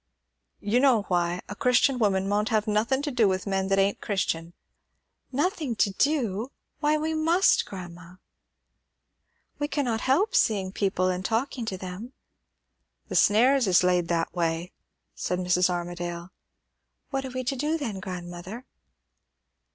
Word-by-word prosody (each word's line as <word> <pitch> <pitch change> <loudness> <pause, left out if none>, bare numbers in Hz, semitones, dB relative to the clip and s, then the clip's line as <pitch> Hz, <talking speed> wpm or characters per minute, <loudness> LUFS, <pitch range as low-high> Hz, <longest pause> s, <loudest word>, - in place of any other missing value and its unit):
"You 210 +4 +1
know 255 -6 +4
why. 175 0 0
A 205 - -7
Christian 250 +3 +3
woman 195 -3 +1
maunt 210 +2 0
have 215 -2 +1
nothin' 225 +6 +1
to 295 - -2
do 235 -5 +3
with 185 -1 -1
men 195 -1 -1
that 195 0 +1
ain't 195 +1 +1
Christian." 170 -4 -2 0.8
"Nothing 295 - -1
to 205 - +2
do! 240 -1 0 0.3
Why, 300 +1 +2
we 315 +1 -2
must, 330 +4 +3
grandma. 180 -2 -10 1.4
We 290 - 0
cannot 260 -7 -1
help 365 - +2
seeing 205 - +2
people 190 -2 0
and 185 0 -2
talking 235 +3 -1
to 195 -4 -4
them." 185 +7 -8 1.0
"The - - -4
snares 245 +3 +4
is 180 -1 +4
laid 180 -1 +2
that 165 -1 -1
way," 170 0 -1 0.4
said 180 - -2
Mrs. 180 0 +2
Armadale. 175 0 -4 0.8
"What 270 -1 -1
are 265 - -5
we 255 0 -4
to 255 +2 -1
do, 300 +5 0
then, 225 -11 -4
grandmother?" 185 +4 -7
205 Hz, 145 wpm, -26 LUFS, 180-260 Hz, 1.4 s, know